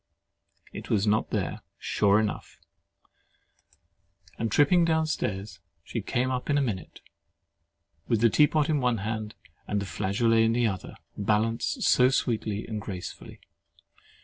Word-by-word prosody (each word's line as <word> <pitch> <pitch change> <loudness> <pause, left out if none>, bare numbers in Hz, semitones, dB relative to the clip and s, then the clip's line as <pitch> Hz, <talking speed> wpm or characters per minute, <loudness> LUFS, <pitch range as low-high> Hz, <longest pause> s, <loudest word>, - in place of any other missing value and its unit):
It - - -8
was 100 -1 +2
not 105 +1 +1
there, - - -2 0.2
sure 100 0 +2
enough; 110 -1 -3 1.8
and 115 -1 -1
tripping 170 - +4
down 160 -1 +2
stairs, 100 - -3 0.2
she 115 - -4
came 125 +5 -1
up 125 +2 -3
in 145 - +3
a - - +3
minute, 105 -8 -5 1.1
with 115 -3 +2
the 115 - +6
tea 150 +5 +5
pot 155 -1 +1
in 155 -3 +1
one 125 -2 +1
hand, 110 0 -4 0.3
and 105 - 0
the 100 - -4
flageolet 115 +4 +1
in 115 0 +2
the 120 0 +2
other, 95 -4 -3 0.2
balanced 110 +2 0
so 125 0 +5
sweetly 110 -5 -1
and 110 -2 -5
gracefully. 95 -4 -8
115 Hz, 145 wpm, -27 LUFS, 105-125 Hz, 1.8 s, the